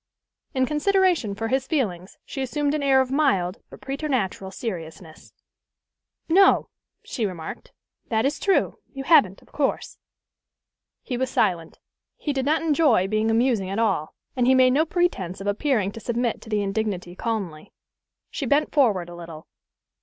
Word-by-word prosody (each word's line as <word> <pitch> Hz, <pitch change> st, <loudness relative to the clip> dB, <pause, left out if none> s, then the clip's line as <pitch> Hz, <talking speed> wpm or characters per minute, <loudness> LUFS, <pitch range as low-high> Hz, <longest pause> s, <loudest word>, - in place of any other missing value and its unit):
In 260 Hz, 0 st, +3 dB
consideration 340 Hz, -, +1 dB
for 225 Hz, +3 st, -3 dB
his 265 Hz, +1 st, 0 dB
feelings 195 Hz, -, -2 dB
she 270 Hz, -, -5 dB
assumed 285 Hz, +2 st, -1 dB
an 305 Hz, -, -1 dB
air 270 Hz, -1 st, +4 dB
of 260 Hz, -1 st, -3 dB
mild 200 Hz, -10 st, +1 dB
but -, -, -13 dB
preternatural 265 Hz, -9 st, -2 dB
seriousness. 170 Hz, -6 st, -7 dB, 1.0 s
"No," 385 Hz, +4 st, +4 dB, 0.3 s
she 235 Hz, -, -4 dB
remarked, 180 Hz, -6 st, -5 dB, 0.4 s
"that 220 Hz, +1 st, +1 dB
is 285 Hz, +2 st, 0 dB
true: 390 Hz, -, +1 dB
you 270 Hz, -, -6 dB
haven't, 210 Hz, -, +4 dB
of -, -, -25 dB
course." 285 Hz, -2 st, -2 dB, 1.0 s
He 250 Hz, -, -3 dB
was 260 Hz, 0 st, -1 dB
silent. 175 Hz, -6 st, 0 dB, 0.4 s
He 295 Hz, -, -2 dB
did 265 Hz, -1 st, -1 dB
not 315 Hz, +2 st, +2 dB
enjoy 290 Hz, -, +3 dB
being 215 Hz, +1 st, +1 dB
amusing 225 Hz, -4 st, +1 dB
at 195 Hz, -, -3 dB
all, 195 Hz, -9 st, 0 dB, 0.2 s
and 250 Hz, -2 st, +1 dB
he 260 Hz, -, +5 dB
made 255 Hz, -1 st, +5 dB
no 310 Hz, +4 st, +2 dB
pretence 300 Hz, -, -1 dB
of 195 Hz, -, -7 dB
appearing 205 Hz, -1 st, 0 dB
to 225 Hz, -, -9 dB
submit 235 Hz, 0 st, -2 dB
to -, -, -12 dB
the 210 Hz, -2 st, 0 dB
indignity 195 Hz, -3 st, -3 dB
calmly. 190 Hz, -9 st, -4 dB, 0.6 s
She 275 Hz, -, -3 dB
bent 290 Hz, +4 st, +2 dB
forward 210 Hz, -, +2 dB
a 175 Hz, -, -10 dB
little. 165 Hz, -2 st, -10 dB
230 Hz, 160 wpm, -24 LUFS, 190-280 Hz, 1.0 s, he